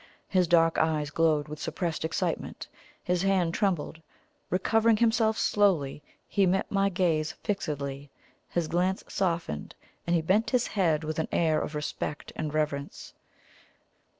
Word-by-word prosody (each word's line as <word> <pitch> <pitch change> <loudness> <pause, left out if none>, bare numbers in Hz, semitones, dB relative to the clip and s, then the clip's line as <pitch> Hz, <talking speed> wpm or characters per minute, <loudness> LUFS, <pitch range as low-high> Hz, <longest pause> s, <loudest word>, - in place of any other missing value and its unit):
His 185 -2 +2
dark 165 -1 +4
eyes 155 -2 +1
glowed 155 -2 +2
with 150 0 -7
suppressed 160 +1 -3
excitement 160 - -2 0.4
his 180 -1 0
hand 185 -3 +2
trembled. 170 -5 -1 0.5
Recovering 220 +4 +3
himself 225 -1 +2
slowly, 170 -9 +2 0.3
he 195 -2 +2
met 190 +2 0
my 195 0 +2
gaze 165 -5 0
fixedly; 145 -8 -3 0.4
his 170 -2 -1
glance 180 +3 0
softened, 170 - -2 0.3
and 170 - +3
he 165 - +1
bent 200 +7 +2
his 250 -2 +2
head 165 -6 +1
with 155 +1 -3
an 160 - 0
air 160 -2 +2
of 150 - -4
respect 150 0 -4
and 155 -1 -3
reverence. 150 -2 -3
170 Hz, 140 wpm, -28 LUFS, 155-195 Hz, 0.5 s, dark